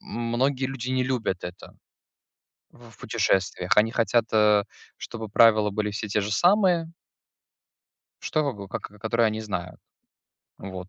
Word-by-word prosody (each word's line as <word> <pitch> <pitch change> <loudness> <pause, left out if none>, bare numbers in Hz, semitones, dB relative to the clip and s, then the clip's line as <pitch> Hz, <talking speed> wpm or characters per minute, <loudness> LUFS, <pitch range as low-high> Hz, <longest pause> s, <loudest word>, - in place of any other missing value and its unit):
м 120 - -7
многие 130 +2 +1
люди 130 -1 -5
не 130 0 +1
любят 115 -8 -2
это 90 0 -10 0.9
в 120 -1 -17
в 105 - -20
путешествиях. 90 -1 0
Они 110 +2 +4
хотят, 115 0 +1
э, 105 -2 +4 0.3
чтобы 110 -2 -7
правила 110 -1 +4
были 105 +1 -2
все 105 +1 -4
те 105 +1 0
же 105 +1 -3
самые. 175 - +3 1.3
Чтобы 145 -4 -1
было 100 -1 -9
как - - -6
к 105 0 -11
которые 115 +1 +1
они 110 +1 -3
знают. 90 -4 -5 0.8
Вот, 95 -1 -8
110 Hz, 150 wpm, -25 LUFS, 100-125 Hz, 1.3 s, Они